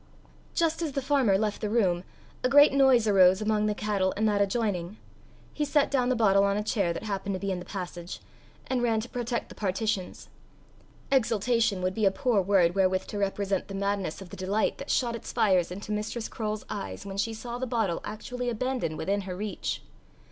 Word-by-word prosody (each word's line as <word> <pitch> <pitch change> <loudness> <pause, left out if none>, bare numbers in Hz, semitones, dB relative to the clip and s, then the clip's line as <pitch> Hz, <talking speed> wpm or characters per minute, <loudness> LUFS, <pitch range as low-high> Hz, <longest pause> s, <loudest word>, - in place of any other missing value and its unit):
Just 330 0 +1
as 310 -4 -2
the 275 - -1
farmer 260 -8 +3
left 210 0 -2
the 210 - -1
room, 185 -6 +2 0.4
a 255 - +2
great 290 +1 +7
noise 265 -5 +5
arose 190 -2 +6
among 215 0 +1
the 210 - 0
cattle 200 -3 0
in 215 - 0
that 205 -2 +2
adjoining; 200 -3 -1 0.6
he 300 - -1
set 290 0 +2
down 255 -3 +2
the 255 - +2
bottle 200 -4 +4
on 200 0 +2
a 210 - -1
chair 200 -5 0
that 170 - -5
happened 200 -2 -3
to - - -4
be 195 0 -2
in 185 - -2
the 175 - -9
passage, 175 -2 -6 0.5
and 255 -2 -1
ran 230 -2 +2
to 230 - -7
protect 240 -1 -3
the - - -9
partitions. 200 0 -2 0.8
Exultation 230 -5 +2
would 185 0 0
be 215 +1 0
a - - +7
poor 225 +1 +1
word 180 -3 +3
wherewith 185 -1 +2
to 205 - -5
represent 200 -1 -1
the 195 - -6
madness 195 -3 -2
of 175 - -15
the - - -7
delight 195 +4 0
that 275 - -7
shot 235 -2 +1
its 230 - -7
fires 185 -5 +2
into 200 +4 -7
Mistress 210 +2 -3
Croale's 215 -1 -4
eyes 200 -1 -6
when 195 0 -6
she 220 +3 0
saw 235 +2 -6
the 260 - -2
bottle 220 -8 0
actually 245 +4 -4
abandoned 240 -8 -2
within 200 +4 -1
her 185 -2 -6
reach. 210 +2 -4
210 Hz, 205 wpm, -28 LUFS, 195-235 Hz, 0.8 s, great